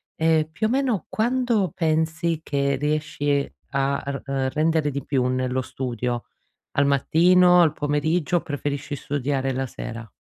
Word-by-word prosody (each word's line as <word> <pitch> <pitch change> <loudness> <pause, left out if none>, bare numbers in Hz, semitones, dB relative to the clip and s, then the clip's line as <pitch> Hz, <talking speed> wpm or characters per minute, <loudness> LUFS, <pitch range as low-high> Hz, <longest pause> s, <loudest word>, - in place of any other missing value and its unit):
ehm, 160 -1 +2
più 215 +7 -1
o - - -3
meno 255 - 0
quando 235 - +1
pensi 160 0 0
che 140 -2 0
riesci 145 -1 0 0.2
a 140 0 0
r 140 0 -4
ehm, 135 -1 -1
rendere 155 0 +2
di 140 -1 -4
più 130 -3 +1
nello 130 0 0
studio: 120 -2 -3 0.5
al 140 - +2
mattino, 175 +6 +5
al 160 -3 +3
pomeriggio 155 +3 0
o - - -9
preferisci 145 0 -4
studiare 135 -1 -1
la 135 +1 -2
sera? 115 -2 -7
145 Hz, 145 wpm, -24 LUFS, 135-165 Hz, 0.5 s, mattino